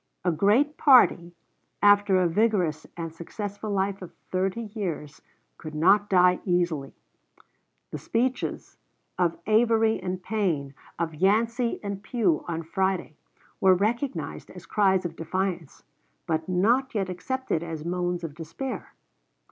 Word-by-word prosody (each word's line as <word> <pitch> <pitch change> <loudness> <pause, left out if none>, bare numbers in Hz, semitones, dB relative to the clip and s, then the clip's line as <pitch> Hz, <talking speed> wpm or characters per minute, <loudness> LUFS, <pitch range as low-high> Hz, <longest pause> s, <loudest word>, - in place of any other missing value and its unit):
A 175 - +3
great 220 - +2
party, 180 - +5 0.5
after 205 -1 +5
a 180 - +3
vigorous 175 -5 +1
and 165 -1 -5
successful 205 +5 -6
life 195 0 -1
of 180 - -10 0.2
thirty 190 +5 -1
years, 165 -8 -5 0.4
could 155 -1 -8
not 195 +6 +4
die 180 -1 +4
easily. 175 -7 -1 1.0
The - - -5
speeches 250 +3 -2 0.4
of 170 -2 +1
Avery 225 0 +3
and 185 0 -4
Payne, 175 -10 -1 0.2
of 165 -1 -2
Yancey 230 - +1
and 200 -1 -4
Pugh, 205 - 0
on 165 -1 -3
Friday, 190 -2 -1 0.4
were 190 -1 +5
recognized 235 +8 -2
as - - -12
cries 190 -3 +2
of 165 -1 -4
defiance, 175 -1 -3 0.4
but 160 +1 -2
not 235 +8 +2
yet 195 -3 0
accepted 185 +1 -3
as 165 -2 -6
moans 175 0 -2
of 160 -3 -5
despair. 170 - -6
190 Hz, 130 wpm, -26 LUFS, 170-215 Hz, 1.0 s, party